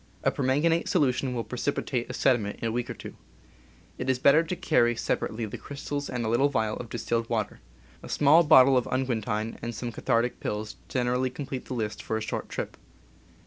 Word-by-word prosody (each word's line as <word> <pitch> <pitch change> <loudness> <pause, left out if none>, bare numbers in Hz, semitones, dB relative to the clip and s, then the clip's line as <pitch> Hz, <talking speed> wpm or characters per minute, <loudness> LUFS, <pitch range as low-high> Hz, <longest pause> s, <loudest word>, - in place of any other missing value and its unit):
A - - +3
permanganate 150 +5 +1
solution 130 -5 +1
will 115 - -1
precipitate 125 -1 -2
a - - -4
sediment 115 -6 +1
in 115 - -2
a - - -1
week 120 +1 -2
or - - -4
two. - - -9 0.8
It 125 - -2
is 130 - +3
better 140 +5 +6
to 165 +2 -3
carry 120 -7 +2
sep - - 0
arately 110 +1 -3
the 105 - -7
crystals 145 0 -5
and 125 -2 -2
a - - -1
little 120 +6 +3
vial 110 -5 0
of 120 - -7
distilled 115 0 -2
water. 110 -3 -2 0.4
A - - -10
small 150 +3 +5
bottle 135 -4 +7
of 125 - 0
unguentine 115 -4 -2
and 120 0 -4
some 120 +2 -4
cathartic 115 +2 0
pills 105 +1 -4
generally 125 0 0
complete 135 0 -6
the 130 - -5
list 105 -3 -3
for 110 - -2
a - - -4
short 110 - -4
trip. - - -5
125 Hz, 200 wpm, -27 LUFS, 115-135 Hz, 0.8 s, bottle